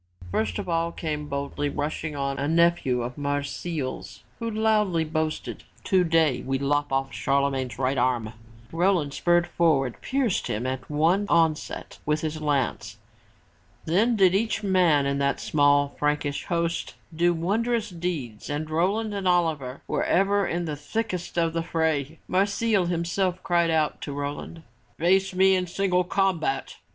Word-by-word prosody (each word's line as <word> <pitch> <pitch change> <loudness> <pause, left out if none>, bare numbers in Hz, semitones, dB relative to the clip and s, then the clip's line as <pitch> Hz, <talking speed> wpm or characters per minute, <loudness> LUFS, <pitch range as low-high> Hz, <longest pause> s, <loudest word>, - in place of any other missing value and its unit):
First 100 -3 -1
of - - -4
all 165 0 0
came 150 -3 -4
boldly 140 +1 -2
rushing 150 +1 -3
on, 140 -1 -2
a 140 - -1
nephew 165 -6 +2
of 125 +3 -6
Marsile's 145 0 -4 0.2
who 230 -1 -2
loudly 210 -6 +2
boasted. 155 0 -3 0.2
"Today 165 -6 +2
we 135 0 -1
lop 145 +1 0
off 135 0 -1
Charlemagne's 135 -2 0
right 130 0 0
arm!" 120 -3 0 0.4
Roland, 170 -4 +1
spurring 175 +2 +3
forward, 160 -7 +1
pierced 260 -7 0
him 110 +4 -2
at 130 0 -4
one 165 +7 +2
onset 165 -2 0
with 150 +1 0
his 155 0 -3
lance. 130 -8 -1 0.9
Then 210 +9 +2
did 190 -3 +5
each 220 +2 0
man 180 -7 +3
in 140 0 0
that 140 0 +1
small 145 -1 +3
Frankish 150 -1 -1
host 170 0 -2 0.2
do 175 +2 +3
wondrous 210 +6 0
deeds 165 -11 -4
and 155 +2 -3
Roland 200 +7 0
and 195 -2 -2
Oliver 160 -7 0
were - - 0
ever 200 +1 +2
in 175 +1 -2
the 155 -2 -3
thickest 180 +4 -4
of 165 -1 +2
the 165 - 0
fray. 160 -2 -1
Marsile 200 0 +1
himself 175 +2 -1
cried 170 -1 +2
out 155 -2 0
to 145 - -5
Roland, 145 +3 -5 0.3
"Face 190 +3 +2
me 190 +1 +5
in 180 -1 -1
single 180 0 +1
combat!" 180 -6 -1
165 Hz, 150 wpm, -25 LUFS, 145-180 Hz, 0.9 s, did